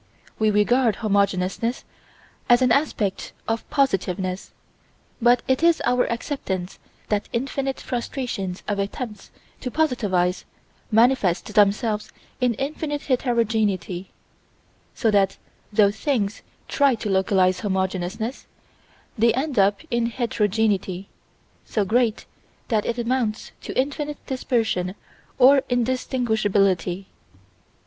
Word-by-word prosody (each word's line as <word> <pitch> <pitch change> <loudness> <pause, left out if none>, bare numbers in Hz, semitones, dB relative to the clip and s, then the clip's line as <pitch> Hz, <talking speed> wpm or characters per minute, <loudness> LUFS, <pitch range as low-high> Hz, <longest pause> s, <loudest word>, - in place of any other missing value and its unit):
We 215 -1 +3
regard 220 +2 +3
homogeneousness 200 +2 0 0.6
as 240 +1 +6
an 250 - +3
aspect 230 -8 0
of 225 0 -2
positiveness, 190 - 0 0.7
but 240 +1 +4
it 260 +2 +2
is 335 -1 +4
our 250 0 +3
acceptance 195 -8 -4 0.3
that 205 -1 -1
infinite 270 +2 -2
frustrations 235 -7 -4
of 205 -1 -1
attempts 210 +1 -5 0.3
to 250 - -4
positivize 205 - +1 0.5
manifest 220 -4 +2
themselves 210 +1 +2 0.3
in 245 -2 +2
infinite 290 +3 -3
heterogeneity: 220 -8 0 0.9
so 225 -4 +2
that 200 -2 +2 0.3
though 205 -1 +4
things 215 -2 -1 0.3
try 280 -3 +3
to 220 - -5
localize 190 -1 +2
homogeneousness 190 +4 -2 0.7
they 230 +1 +5
end 265 -3 -1
up 200 +1 +3
in 235 -1 +1
heterogeneity 210 -5 0 0.5
so 210 -3 -1
great 225 +2 +1 0.4
that 220 -4 +1
it 235 - -1
amounts 235 -2 -1
to - - -3
infinite 290 +2 -1
dispersion 225 -8 -1 0.4
or 270 +2 +7
indistinguishability. 215 -7 +1
220 Hz, 105 wpm, -23 LUFS, 195-250 Hz, 0.9 s, or